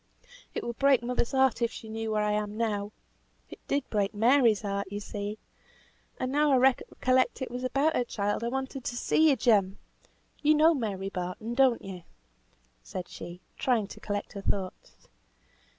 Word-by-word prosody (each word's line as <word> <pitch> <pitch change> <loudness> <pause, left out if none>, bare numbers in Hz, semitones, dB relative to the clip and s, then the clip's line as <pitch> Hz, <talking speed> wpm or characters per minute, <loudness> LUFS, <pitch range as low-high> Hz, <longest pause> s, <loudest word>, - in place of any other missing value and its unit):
It - - -2
would 235 -1 -5
break 275 -3 +4
mother's 245 -1 -1
heart 265 -2 +3
if 235 - +1
she 220 - -9
knew 220 0 -4
what 215 -1 +1
I 210 - +1
am 210 0 -2
now 210 -3 -1 0.6
it - - -10
did 280 -1 0
break 205 -1 0
Mary's 230 -1 +4
heart, 200 -1 -3
you 205 - -3
see. 205 0 -5 0.8
And 255 0 -2
now 295 +1 +3
I - - +6
recollect 255 0 +2
it 260 -3 -4
was 250 +1 -5
about 275 +5 +1
her - - +2
child 205 -2 -2
I - - 0
wanted 265 +1 -4
so - - -2
to - - -5
see 315 +5 +3
you, 280 - +4
Jem. 205 -5 +2 0.6
You 305 +1 +4
know 315 +2 +6
Mary 200 -8 -3
Barton, 185 +5 -4
don't 260 -2 +3
you?" 190 -2 -7 0.8
said 180 - -6
she, 175 +1 -9 0.2
trying 240 -5 +1
to - - -10
collect 205 -1 -4
her 200 - -6
thoughts. 190 -2 -4
230 Hz, 180 wpm, -29 LUFS, 205-260 Hz, 0.8 s, I